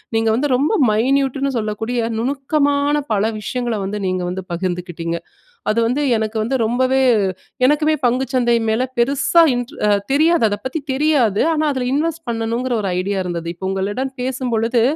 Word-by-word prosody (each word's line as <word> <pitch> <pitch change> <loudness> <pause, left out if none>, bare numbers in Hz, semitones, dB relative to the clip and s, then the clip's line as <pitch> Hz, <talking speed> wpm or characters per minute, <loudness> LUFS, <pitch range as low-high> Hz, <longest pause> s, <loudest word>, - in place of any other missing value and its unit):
நீங்க 225 0 +2
வந்து 275 +5 0
ரொம்ப 280 +4 +1 0.2
மைன்யூட்டுன்னு 270 +4 +1
சொல்லக்கூடிய 220 +2 -2 0.2
நுணுக்கமான 285 +3 +1 0.2
பல 200 -1 +1 0.2
விஷயங்கள 240 +2 -2
வந்து 200 +2 -3
நீங்க 185 0 -1
வந்து 185 +1 -4
பகிர்ந்துக்கிட்டீங்க. 175 -2 -3 0.5
அது 215 - +2
வந்து 260 +5 0 0.2
எனக்கு 220 0 -2
வந்து 250 +5 -1
ரொம்பவே 255 +3 +2 0.6
எனக்குமே 300 +3 +3
பங்கு 250 +2 +2
சந்தை 240 -2 +3
மேல 220 +3 +1 0.2
பெருசா 275 +7 +3
இன்ட் 245 +4 -4 0.4
தெரியாது, 320 +1 +3
அத 205 - -1
பத்தி 260 +5 -2
தெரியாது. 265 -8 +2
ஆனா 310 0 0
அதுல 260 -2 -2
இன்வெஸ்ட் 325 +3 -1
பண்ணணுங்கற 235 +2 -1
ஒரு 195 - -2
ஐடியா 195 +2 -2
இருந்தது. 170 -2 -4
இப்ப 190 +2 -5
உங்களிடம் 205 +8 -2
பேசும்பொழுது 245 -2 0
245 Hz, 150 wpm, -19 LUFS, 215-275 Hz, 0.6 s, எனக்குமே